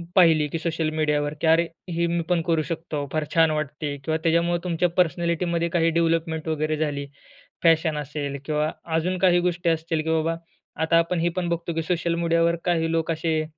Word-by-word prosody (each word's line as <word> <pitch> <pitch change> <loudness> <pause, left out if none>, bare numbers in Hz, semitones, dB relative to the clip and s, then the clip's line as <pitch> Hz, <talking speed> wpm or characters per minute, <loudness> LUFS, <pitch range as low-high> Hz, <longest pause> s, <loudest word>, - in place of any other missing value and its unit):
पाहिली 160 -5 +5
की 165 +3 -4
सोशल 160 -1 -1
मीडियावर 150 -1 0
की, 165 - +1
अरे! 165 +1 +4 0.2
हे 170 0 0
मी 170 0 0
पण 175 -2 +2
करू 165 -2 +2
शकतो, 160 -3 -4
फार 155 -1 0
छान 165 -1 +5
वाटते. 150 -1 -3
किंवा 160 +2 0
त्याच्यामुळं 170 +1 +2
तुमच्या 175 0 +1
पर्सनॅलिटीमध्ये 170 0 +1
काही 165 -1 +2
डेव्हलपमेंट 165 -1 0
वगैरे 155 0 -1
झाली. 145 -2 -2 0.6
फॅशन 160 -2 +3
असेल 145 -1 -4
किंवा 150 0 0 0.3
अजून 180 +3 0
काही 180 -1 +4
गोष्टी 175 -1 0
असतील, 160 -1 0
की 160 - -3
बाबा 160 +1 +1 0.5
आता 165 +1 +3
आपण 170 +1 +1
हे 170 +1 +2
पण 180 -2 -1
बघतो, 170 0 -2
की 165 - -1
सोशल 170 0 0
मीडियावर 170 0 +2
काही 165 -2 +1
लोक 165 0 0
असे 160 -1 0
165 Hz, 185 wpm, -24 LUFS, 155-170 Hz, 0.6 s, पाहिली